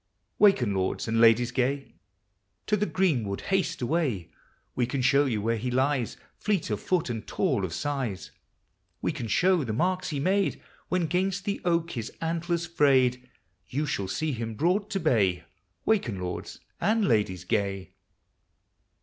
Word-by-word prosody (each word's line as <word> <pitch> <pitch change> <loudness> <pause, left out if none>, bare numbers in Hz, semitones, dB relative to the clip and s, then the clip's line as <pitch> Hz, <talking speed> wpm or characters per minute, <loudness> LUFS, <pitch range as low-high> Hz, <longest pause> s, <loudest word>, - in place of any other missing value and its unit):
Waken, 135 - +5
lords 95 +3 -1
and 115 +1 +2
ladies 115 +1 +5
gay, 135 +2 -1 0.7
To 210 - +2
the 210 0 0
greenwood 125 - 0
haste 170 -7 -1
away; 125 - -1 0.4
We 120 - 0
can 130 0 -2
show 140 +3 +4
yon 110 -6 -1
where 115 +1 +1
he 125 +3 -3
lies. 130 -1 0 0.2
Fleet 200 - -1
of 105 - -2
foot 175 -8 0
and 115 -1 -5
tall 100 - 0
of 90 - -2
size; 120 - -3 0.7
We - - +1
can 135 -7 -5
show 180 - +3
the 115 -4 -3
marks 185 +9 0
he 145 -4 -2
made 190 +6 +1 0.3
When 180 -2 +1
'gainst 185 +4 -1
the 200 - -2
oak 170 -1 +1
his 115 -6 -5
antlers 170 +1 -1
frayed; 130 -6 +2 0.4
You 145 +7 -1
shall 100 -9 -2
see 155 +10 -1
him 115 -3 -4
brought 185 - +1
to 200 -2 -1
bay; 100 - +2 0.4
Waken, 160 - +1
lords 90 -1 -5 0.2
and 220 0 +2
Ladies 100 -6 +1
gay. 100 -2 -2
135 Hz, 160 wpm, -27 LUFS, 110-175 Hz, 0.7 s, Waken